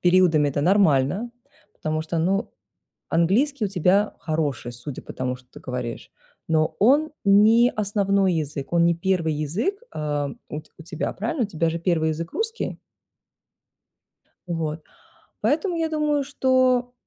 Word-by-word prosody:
периодами 175 -5 +4
это 145 +1 -1
нормально. 185 - +3 0.4
Потому 155 0 -2
что, 165 +1 -3
ну, 195 +6 0 0.6
английский 215 - +2
у - - -4
тебя 195 +3 +2
хороший, 150 -6 -2
судя 125 +3 -8
по - - -9
тому, 125 0 -3
что 125 0 -22
ты - - -13
говоришь. 125 -2 -5 0.4
Но 155 -1 +1
он 290 +8 +4
не 220 +5 +6
основной 200 -3 +1
язык, 150 -1 -4
он 170 0 +4
не 170 - +3
1 170 -2 0
язык, 165 - -1 0.2
а, 145 -2 -2 0.2
у 150 - -4
т - - -26
у - - -10
тебя, 170 0 -4
правильно? 230 +5 -1
У - - -2
тебя 165 -3 0
же 165 - -3
1 165 -2 +1
язык 165 +2 -5
русский? 450 +2 -3 1.7
Вот. 160 -2 -3 0.6
Поэтому, 340 +4 +1
я 325 -1 0
думаю 300 -2 +1
что, 255 -2 +2
175 Hz, 150 wpm, -24 LUFS, 155-230 Hz, 1.7 s, не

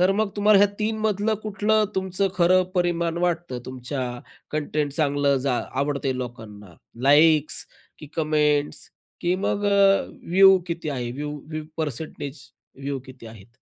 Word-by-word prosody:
तर 185 +2 +4
मग 210 0 0
तुम्हाला 205 0 +5
ह्या 205 0 +5
3 220 +1 -1
मधलं 215 0 +1
कुठलं 215 +1 +1
तुमचं 190 +1 0
खरं 185 +1 +4
परिमाण 170 -1 0
वाटतं 175 -7 -1
तुमच्या 130 +1 -5 0.5
कंटेंट 150 -1 -1
चांगलं 145 -2 +1
जा 130 -3 +1 0.2
आवडतंय 140 -2 -1
लोकांना? 105 -7 -8 0.3
लाईक्स 150 +2 +4 0.3
की 150 - -10
कमेंट्स 150 -2 0 0.3
की 175 +1 +1
मग 205 +1 -1
अ, 200 -1 +4 0.3
व्ह्यू 190 +1 +7
किती 170 -2 -4
आहे, 120 -3 -3
व्ह्यू 145 +2 -5 0.2
व्ह्यू 155 -1 -4
परसेंटेज 145 -1 -5 0.4
व्ह्यू 140 0 -3
किती 130 -3 -12
आहेत? 110 -1 -13
155 Hz, 140 wpm, -24 LUFS, 140-190 Hz, 0.5 s, व्ह्यू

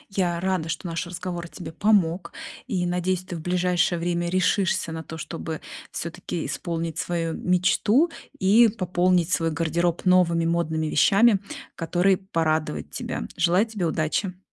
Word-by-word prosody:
Я 175 -3 +1
рада, 185 -3 0
что 165 +3 -4
наш 165 +1 -3
разговор 175 0 -5
тебе 175 - -8
помог, 180 -3 +1 0.3
и, 185 -7 -1
надеюсь, 180 +1 -1
ты 175 -2 -6
в - - -7
ближайшее 180 0 +1
время 175 0 -1
решишься 185 -1 +1
на 160 0 -5
то, 160 0 -8
чтобы 165 -1 -5 0.3
всё-таки 170 0 -5
исполнить 165 -1 -3
свою 165 -2 -2
мечту 205 - +2 0.3
и 225 +2 +6
пополнить 180 -3 +1
свой 165 -2 +1
гардероб 165 +2 0
новыми 175 -2 +4
модными 160 -2 0
вещами, 205 +5 +4 0.4
которые 180 +3 +2
порадовать 160 - -1
тебя. - - -4
Желаете 180 +6 +2
тебе 180 -4 0
удачи! 175 +4 -1
175 Hz, 140 wpm, -24 LUFS, 165-185 Hz, 0.4 s, и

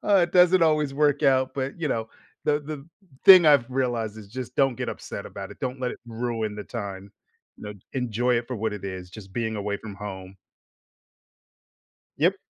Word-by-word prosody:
it 175 -2 +3
doesn't 180 0 +5
always 150 -3 +2
work 145 0 +2
out, 130 -2 +3
but, 135 +4 -4
you 160 - -1
know, 115 -4 -2 0.4
the 150 0 +2
the 145 -1 -7 0.4
thing 185 -3 +10
I've 140 -6 +5
realized 120 -5 -1
is 105 -2 -10
just 125 +3 -7
don't 135 -2 +3
get - - -3
upset - - -7
about - - -8
it; - - -14
don't 130 +1 -4
let 125 -1 -1
it - - -10
ruin 115 -2 -3
the 105 - -6
time. 100 -4 -7 0.5
You - - -13
know, 105 - -6 0.2
enjoy 125 -1 0
it 120 0 -4
for 125 - -4
what 110 -1 -2
it 105 -1 -7
is, 95 -2 -6
just 95 +1 -12
being 110 -1 -2
away 100 0 -2
from 105 -2 -9
home. 95 -2 -8 1.8
Yep. - - +3
120 Hz, 190 wpm, -25 LUFS, 105-140 Hz, 1.8 s, thing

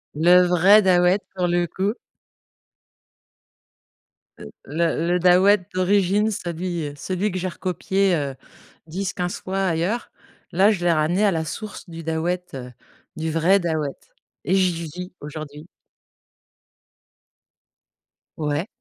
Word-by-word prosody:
Le 175 +4 +6
vrai 180 +4 +5
Dahouët 180 0 +3
pour 180 -1 0
le 175 0 +1
coup. 195 +5 -1 2.4
Le - - -10 0.2
le 165 +1 -1
le 175 +1 +2
Dahouët 185 +2 +5
d'origine 200 +3 +2
celui, 175 -3 -4
heu, 145 - -7
celui 185 +7 -2
que 185 - -3
j'ai 185 0 -2
recopié, 185 +1 0
heu, 140 -4 -3 0.5
10-15 180 +1 -3
fois 195 +1 -2
ailleurs, 180 +7 -1 0.4
là 195 +5 +4
je 185 -5 -2
l'ai 175 - +4
ramené 170 +6 +2
à 200 - +4
la 160 -2 -2
source 205 +4 -7
du 165 0 -8
Dahouët, 170 +3 -2
heu, 125 -1 -7 0.4
du 160 0 -3
vrai 170 +5 +3
Dahouët 160 -5 -2 0.5
et 180 +6 +2
j'y 180 -3 +1
vis 180 +4 -8
aujourd'hui 150 +1 -8 2.7
Ouais. 150 +3 -2
180 Hz, 125 wpm, -22 LUFS, 160-190 Hz, 2.7 s, Le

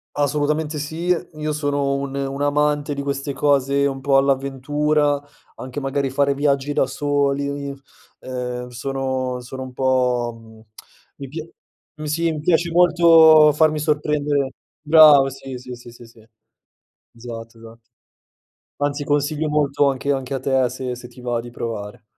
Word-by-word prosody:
Assolutamente 150 +2 -1
sì, 160 +4 -5 0.3
io 155 0 -3
sono 145 -2 -1
un 140 0 -4
un 140 0 -3
amante 145 0 +1
di 140 - -4
queste 140 0 -3
cose 140 0 +2
un 135 -1 -2
po' 135 0 +3
all'avventura, 140 +2 +1 0.4
anche 130 +2 -6
magari 135 0 -1
fare 140 +1 +1
viaggi 140 0 0
da 135 - +1
soli, 140 0 -1 0.5
ehm, 125 -1 -5
sono 130 0 -3
sono 130 +2 -8
un 130 -1 -8
po', 125 -2 +1
mhmm, 110 -1 -16 0.6
mi 140 - -7
pia 155 +4 -7 0.5
mh, 155 - -8
sì, 165 +2 0
mi 155 - -4
piace 170 +2 +1
molto 165 -3 +6
farmi 155 +1 +2
sorprendere 150 -2 0 0.3
Bravo, 150 -3 +7
sì, 135 0 -9
sì, 125 0 -9
sì, 120 0 -13
esatto 115 -2 -19 1.0
esatto, 115 0 -14 1.0
anzi 145 0 -2
consiglio 145 +2 0
molto 145 -1 +2
anche 135 +1 -3
anche 135 -1 -4
a 135 - -2
te, 130 -1 +1
se 125 -1 -5
se 120 0 -11
ti 125 +1 -15
va 120 -1 -2
di 120 +1 -10
provare. 110 -4 -6
140 Hz, 145 wpm, -21 LUFS, 130-150 Hz, 1.0 s, Bravo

